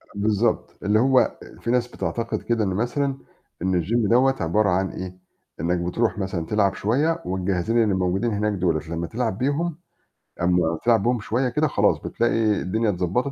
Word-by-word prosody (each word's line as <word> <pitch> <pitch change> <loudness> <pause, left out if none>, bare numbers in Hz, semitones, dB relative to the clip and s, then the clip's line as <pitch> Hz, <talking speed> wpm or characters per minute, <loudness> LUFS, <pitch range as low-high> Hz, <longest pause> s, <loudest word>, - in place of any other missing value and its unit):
بالضبط. 110 +2 0
اللي 105 +2 +3
هو 130 +1 +3 0.2
فيه 115 - -2
ناس 125 -1 +2
بتعتقد 115 -1 -3
كده 115 -2 0
إن 100 - 0
مثلًا 125 +8 -1 0.4
إن 90 -1 +1
الgym 110 +3 +1
دوّة 130 +3 +4
عبارة 100 +6 +2
عن 95 +1 +1
إيه، 90 0 -7 0.4
إنّك 85 +2 0
بترُوح 95 +3 -1
مثلًا 95 -4 -3
تلعب 100 +1 +1
شوية 150 +10 0
والجهازين 95 +5 0
اللي 105 -3 +1
موجودين 95 +5 0
هناك 105 0 0
دُولة 90 -5 +1
لمّا 85 0 -3
تلعب 115 -1 -2
بيهم 145 +6 -1 0.6
أمّا 85 -2 +2
تلعب 115 -4 +3
بيهم 120 +1 +1
شوية 120 +5 -1
كده 150 +5 +1
خلاص - - +2
بتلاقي 115 -3 0
الدنيا 110 +5 0
اتضبّطت 95 +9 -1
105 Hz, 165 wpm, -23 LUFS, 95-120 Hz, 0.6 s, دوّة